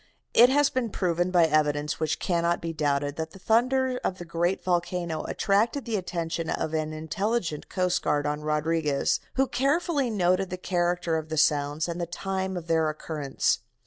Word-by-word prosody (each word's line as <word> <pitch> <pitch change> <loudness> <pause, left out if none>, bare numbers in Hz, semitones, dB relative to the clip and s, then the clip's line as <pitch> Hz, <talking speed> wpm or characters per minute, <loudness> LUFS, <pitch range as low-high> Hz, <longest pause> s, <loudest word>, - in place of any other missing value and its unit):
It 240 +2 +8
has 290 +1 +3
been 255 -3 -1
proved 175 -2 0
by 175 -2 +5
evidence 150 -1 +1
which 155 -1 0
cannot 170 -1 0
be 165 0 -4
doubted 145 -2 -1
that 160 0 -4
the - - -11
thunders 250 +5 +2
of 185 - -1
the 175 - -8
great 170 +2 -1
volcano 175 -2 -1
attracted 220 +7 +1
the 230 -2 -2
attention 170 -3 -3
of 160 - -2
an 155 -1 -1
intelligent 170 +2 -2
coast 180 -1 0
guard 145 0 0
on 150 0 -1
Rodriguez, 150 -1 0 0.2
who 270 - +3
carefully 285 +1 +1
noted 185 -2 +1
the 185 - -4
character 175 -2 0
of 160 0 -5
the 160 - -3
sounds 145 +1 +2
and 170 0 -4
the 170 - -2
time 190 +1 -3
of 170 - -6
their 160 -2 +2
occurrence. 150 -2 -1
170 Hz, 175 wpm, -27 LUFS, 155-195 Hz, 0.2 s, It